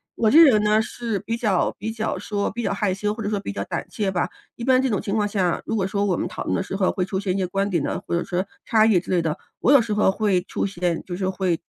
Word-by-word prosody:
我 220 Hz, -, +2 dB
这 305 Hz, -, +7 dB
个 290 Hz, -, +8 dB
人 215 Hz, -2 st, +3 dB
呢， 210 Hz, +1 st, +3 dB
是 230 Hz, -2 st, -3 dB
比 230 Hz, -, -3 dB
较 210 Hz, -6 st, +1 dB
比 220 Hz, +3 st, -3 dB
较 220 Hz, 0 st, -3 dB
说 205 Hz, -1 st, -2 dB
比 235 Hz, +4 st, -4 dB
较 210 Hz, -, -1 dB
害 200 Hz, -2 st, 0 dB
羞 210 Hz, +2 st, -1 dB
或 220 Hz, -1 st, -6 dB
者 205 Hz, -, -1 dB
说 210 Hz, -, -1 dB
比 145 Hz, -, -5 dB
较 100 Hz, 0 st, -3 dB
胆 -, -, -4 dB
怯 200 Hz, -3 st, -1 dB
吧。 175 Hz, -, -1 dB, 0.3 s
一 235 Hz, -, -7 dB
般 255 Hz, +1 st, +4 dB
这 265 Hz, -, +1 dB
种 205 Hz, -5 st, 0 dB
情 200 Hz, -, -2 dB
况 210 Hz, -2 st, +1 dB
下 190 Hz, -4 st, 0 dB
如 225 Hz, -, -2 dB
果 195 Hz, -3 st, 0 dB
说 200 Hz, +1 st, 0 dB
我 185 Hz, -, +1 dB
们 -, -, -2 dB
讨 -, -, -6 dB
论 -, -, -1 dB
的 -, -, 0 dB
时 190 Hz, -, -5 dB
候 190 Hz, -1 st, +2 dB
会 185 Hz, -, -1 dB
出 190 Hz, 0 st, -2 dB
现 195 Hz, -2 st, -1 dB
一 195 Hz, -, -2 dB
些 185 Hz, -2 st, 0 dB
观 195 Hz, +2 st, -1 dB
点 170 Hz, -5 st, +1 dB
呢， -, -, -2 dB
或 -, -, -4 dB
者 170 Hz, -, 0 dB
说 180 Hz, +2 st, -2 dB, 0.2 s
差 220 Hz, -2 st, +4 dB
异 205 Hz, -6 st, +4 dB
之 -, -, -12 dB
类 180 Hz, -2 st, +2 dB
的， 160 Hz, -2 st, -2 dB, 0.2 s
我 255 Hz, -, +4 dB
有 275 Hz, -, +7 dB
时 220 Hz, -2 st, -2 dB
候 210 Hz, -2 st, +4 dB
会 195 Hz, -4 st, +1 dB
出 -, -, -3 dB
现 175 Hz, -3 st, -1 dB
就 175 Hz, -, -5 dB
是 185 Hz, +1 st, -2 dB
会 185 Hz, -3 st, -1 dB
200 Hz, 340 characters per minute, -23 LUFS, 185-220 Hz, 0.3 s, 个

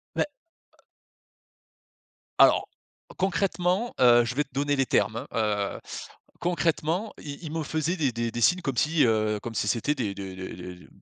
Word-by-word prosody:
beh -, -, +2 dB, 2.1 s
alors -, -, +6 dB, 0.5 s
concrètement, 190 Hz, +3 st, 0 dB
heu, 120 Hz, -1 st, +6 dB
je 125 Hz, +2 st, -3 dB
vais 150 Hz, -, +2 dB
te 140 Hz, -, -31 dB
donner 145 Hz, +1 st, +1 dB
les 135 Hz, -1 st, +2 dB
termes, 110 Hz, -, +1 dB
hein, 105 Hz, -3 st, 0 dB
heu. -, -, -10 dB, 0.6 s
Concrètement, 175 Hz, +3 st, 0 dB
ils 140 Hz, -1 st, -7 dB
ils 155 Hz, -, -5 dB
me 160 Hz, -1 st, -2 dB
faisaient 160 Hz, +3 st, -1 dB
des 140 Hz, -5 st, +1 dB
des 115 Hz, 0 st, -2 dB
des 120 Hz, -, -4 dB
signes 180 Hz, +8 st, +4 dB
comme 135 Hz, -6 st, -3 dB
si, 160 Hz, +1 st, +3 dB
heu, 110 Hz, -2 st, +1 dB
comme 115 Hz, 0 st, -6 dB
si 105 Hz, -, 0 dB
c'était 120 Hz, +8 st, +1 dB
des 100 Hz, -6 st, -2 dB
des 95 Hz, -1 st, -7 dB
des 90 Hz, -1 st, -8 dB
135 Hz, 165 wpm, -27 LUFS, 110-165 Hz, 2.1 s, alors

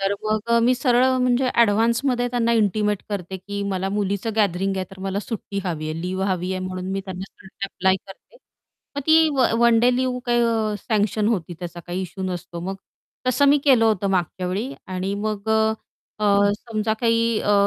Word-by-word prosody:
तर 195 Hz, +1 st, +1 dB
मग 215 Hz, 0 st, +1 dB, 0.2 s
अ, 235 Hz, -, +5 dB
मी 250 Hz, +2 st, +4 dB
सरळ 245 Hz, -1 st, +3 dB
म्हणजे 250 Hz, +1 st, +2 dB
ॲडव्हान्समध्ये 235 Hz, +3 st, +2 dB
त्यांना 235 Hz, -1 st, +1 dB
इंटिमेट 210 Hz, -2 st, +1 dB
करते 190 Hz, -2 st, -4 dB
की 200 Hz, +2 st, -5 dB
मला 190 Hz, 0 st, -1 dB
मुलीचं 200 Hz, +2 st, -1 dB
गॅदरिंग 195 Hz, -1 st, +1 dB
आहे, 190 Hz, -, -1 dB
तर 195 Hz, -, -13 dB
मला 195 Hz, +1 st, -2 dB
सुट्टी 205 Hz, -2 st, -5 dB
हवी 155 Hz, -3 st, -3 dB
आहे, 160 Hz, +1 st, -4 dB
लीव्ह 185 Hz, +2 st, -2 dB
हवी 185 Hz, 0 st, -1 dB
आहे 185 Hz, -, -3 dB
म्हणून 185 Hz, 0 st, -5 dB
मी 195 Hz, -, -1 dB
त्यांना 190 Hz, 0 st, -9 dB, 0.2 s
अप्लाय 190 Hz, -1 st, +1 dB
करते 195 Hz, -, -15 dB, 0.6 s
मग -, -, 0 dB
ती 320 Hz, 0 st, +6 dB
व 260 Hz, -, +4 dB
वन 235 Hz, -1 st, +5 dB
डे 245 Hz, +1 st, +4 dB
लिव्ह 255 Hz, -1 st, 0 dB, 0.5 s
अ, -, -, -2 dB
सँक्शन 210 Hz, -1 st, 0 dB
होती 180 Hz, -6 st, -1 dB
त्याचा 175 Hz, -1 st, -7 dB
काही 180 Hz, +2 st, -3 dB
इश्यू 190 Hz, +1 st, -6 dB
नसतो 175 Hz, -2 st, -5 dB
मग. 190 Hz, +3 st, -4 dB, 0.5 s
तसं 270 Hz, +3 st, +3 dB
मी 290 Hz, +1 st, +5 dB
केलं 255 Hz, -6 st, +5 dB
होतं 205 Hz, -3 st, +2 dB
मागच्यावेळी 185 Hz, -, -2 dB
आणि 185 Hz, +1 st, -3 dB
मग 210 Hz, 0 st, -3 dB
अ, 220 Hz, 0 st, +3 dB, 0.5 s
अ, 205 Hz, -1 st, +3 dB
समजा 220 Hz, -2 st, -2 dB
काही 230 Hz, -1 st, +2 dB
अ, 205 Hz, -, +1 dB
205 Hz, 185 wpm, -22 LUFS, 190-230 Hz, 0.6 s, ती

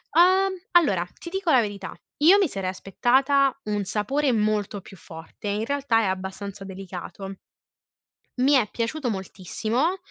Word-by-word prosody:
Uhm, 375 Hz, +2 st, +5 dB, 0.2 s
allora 205 Hz, -, +4 dB, 0.2 s
ti 340 Hz, -, -8 dB
dico 385 Hz, -3 st, -2 dB
la 265 Hz, -, +6 dB
verità, 205 Hz, -4 st, -3 dB, 0.3 s
io 345 Hz, +7 st, +6 dB
mi 390 Hz, -4 st, +3 dB
sarei 195 Hz, -6 st, -3 dB
aspettata 265 Hz, +9 st, +2 dB
un 210 Hz, -1 st, -2 dB
sapore 265 Hz, +9 st, 0 dB
molto 210 Hz, -2 st, 0 dB
più 195 Hz, -, -14 dB
forte, 165 Hz, +3 st, -10 dB
in 205 Hz, +2 st, -1 dB
realtà 275 Hz, -4 st, +1 dB
è -, -, 0 dB
abbastanza 190 Hz, +1 st, -4 dB
delicato 195 Hz, 0 st, -8 dB, 1.0 s
mi 265 Hz, +3 st, +3 dB
è 245 Hz, -6 st, +4 dB
piaciuto 245 Hz, +3 st, -2 dB
moltissimo, 220 Hz, -, -2 dB
215 Hz, 145 wpm, -25 LUFS, 195-280 Hz, 1.0 s, la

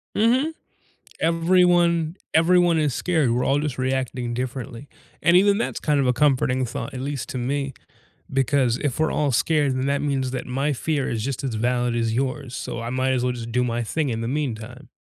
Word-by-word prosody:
Mhm. 250 Hz, +8 st, +3 dB, 0.7 s
Everyone 170 Hz, 0 st, +3 dB, 0.2 s
everyone 175 Hz, 0 st, +4 dB
is 150 Hz, -4 st, +1 dB
scared, 160 Hz, -7 st, +1 dB
we're 125 Hz, +1 st, 0 dB
all 140 Hz, -, +2 dB
just 145 Hz, -3 st, -3 dB
reacting 130 Hz, -2 st, -2 dB
differently, 125 Hz, +1 st, -5 dB, 0.3 s
and 170 Hz, +1 st, +5 dB
even 200 Hz, +2 st, +4 dB
that's 235 Hz, -, -2 dB
kind 150 Hz, -2 st, +1 dB
of 135 Hz, -, +1 dB
a 125 Hz, -, +4 dB
comforting 130 Hz, -1 st, +2 dB
thought, 125 Hz, +3 st, -5 dB
at 130 Hz, -, -5 dB
least 140 Hz, -1 st, -4 dB
to 130 Hz, -, -4 dB
me, 135 Hz, +2 st, -2 dB, 0.6 s
because 135 Hz, -2 st, +2 dB
if 145 Hz, -1 st, -2 dB
we're 160 Hz, -, +2 dB
all 145 Hz, -2 st, +1 dB
scared, 145 Hz, +2 st, +2 dB
then 130 Hz, +1 st, -1 dB
that 140 Hz, 0 st, 0 dB
means 135 Hz, -3 st, -1 dB
that 130 Hz, -1 st, -4 dB
my 135 Hz, +4 st, 0 dB
fear 145 Hz, +1 st, -1 dB
is 110 Hz, -2 st, -2 dB
just 135 Hz, +1 st, -3 dB
as 130 Hz, -5 st, -2 dB
valid 120 Hz, +1 st, 0 dB
as 115 Hz, -1 st, 0 dB
yours, 130 Hz, +1 st, -2 dB
so 115 Hz, -, -5 dB
I 115 Hz, -, -4 dB
might 130 Hz, +1 st, 0 dB
as 125 Hz, -1 st, 0 dB
well 125 Hz, 0 st, 0 dB
just 115 Hz, -1 st, -7 dB
do 125 Hz, +1 st, +1 dB
my 120 Hz, -1 st, -1 dB
thing 150 Hz, +5 st, -1 dB
in 115 Hz, -2 st, -2 dB
the 115 Hz, -, -3 dB
meantime. 125 Hz, -2 st, -4 dB
135 Hz, 205 wpm, -23 LUFS, 125-150 Hz, 0.7 s, and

